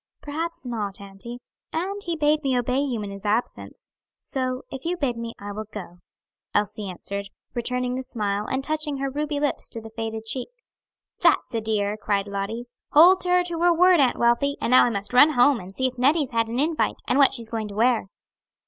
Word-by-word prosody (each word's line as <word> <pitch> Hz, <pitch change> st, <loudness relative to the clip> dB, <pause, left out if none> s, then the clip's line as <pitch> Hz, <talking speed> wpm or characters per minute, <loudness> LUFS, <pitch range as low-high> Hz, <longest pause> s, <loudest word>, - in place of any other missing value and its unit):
"Perhaps 320 Hz, 0 st, -5 dB
not, 210 Hz, -5 st, -3 dB
auntie; 200 Hz, +4 st, -8 dB, 0.3 s
and 390 Hz, +5 st, -3 dB
he 340 Hz, -1 st, -2 dB
bade 305 Hz, 0 st, +2 dB
me 265 Hz, -3 st, +1 dB
obey 250 Hz, +2 st, 0 dB
you 255 Hz, -6 st, -1 dB
in 200 Hz, -, -6 dB
his 200 Hz, 0 st, -9 dB
absence; 215 Hz, +3 st, -2 dB, 0.3 s
so 255 Hz, -2 st, -2 dB
if 270 Hz, -, -7 dB
you 350 Hz, +2 st, -1 dB
bid 275 Hz, -7 st, 0 dB
me, 230 Hz, 0 st, -6 dB
I 205 Hz, 0 st, -7 dB
will 215 Hz, +1 st, -6 dB
go," 180 Hz, -4 st, -8 dB, 0.6 s
Elsie 210 Hz, -1 st, 0 dB
answered, 200 Hz, +2 st, -5 dB, 0.3 s
returning 250 Hz, +1 st, -2 dB
the 260 Hz, -, -2 dB
smile, 210 Hz, -5 st, -2 dB
and 265 Hz, +1 st, -2 dB
touching 305 Hz, -1 st, -2 dB
her 275 Hz, 0 st, -2 dB
ruby 295 Hz, +1 st, -2 dB
lips 290 Hz, -1 st, 0 dB
to 230 Hz, -, -8 dB
the 225 Hz, 0 st, -11 dB
faded 225 Hz, 0 st, -5 dB
cheek. 250 Hz, -, -2 dB, 0.7 s
"That's 255 Hz, -, +3 dB
a 225 Hz, -, 0 dB
dear," 210 Hz, -1 st, 0 dB
cried 205 Hz, -2 st, -1 dB
Lottie. 200 Hz, +4 st, -4 dB, 0.3 s
"Hold 355 Hz, +5 st, +7 dB
her 360 Hz, 0 st, +3 dB
to 345 Hz, -2 st, -4 dB
her 350 Hz, 0 st, +5 dB
word, 360 Hz, 0 st, +5 dB
Aunt 260 Hz, -3 st, +3 dB
Wealthy. 240 Hz, +4 st, +2 dB
And -, -, -1 dB
now 255 Hz, -, +7 dB
I -, -, +2 dB
must 205 Hz, +1 st, -4 dB
run 290 Hz, +5 st, +7 dB
home, 250 Hz, 0 st, +5 dB
and 190 Hz, 0 st, -11 dB
see 260 Hz, -, 0 dB
if 255 Hz, -1 st, -2 dB
Nettie's 285 Hz, +1 st, +3 dB
had 230 Hz, -1 st, +1 dB
an 230 Hz, +2 st, -4 dB
invite, 310 Hz, +2 st, 0 dB
and 255 Hz, -, +2 dB
what 275 Hz, -1 st, +6 dB
she's 230 Hz, -3 st, +1 dB
going 225 Hz, -2 st, -3 dB
to 200 Hz, -, -9 dB
wear." 230 Hz, -2 st, +2 dB
245 Hz, 210 wpm, -24 LUFS, 215-285 Hz, 0.7 s, Hold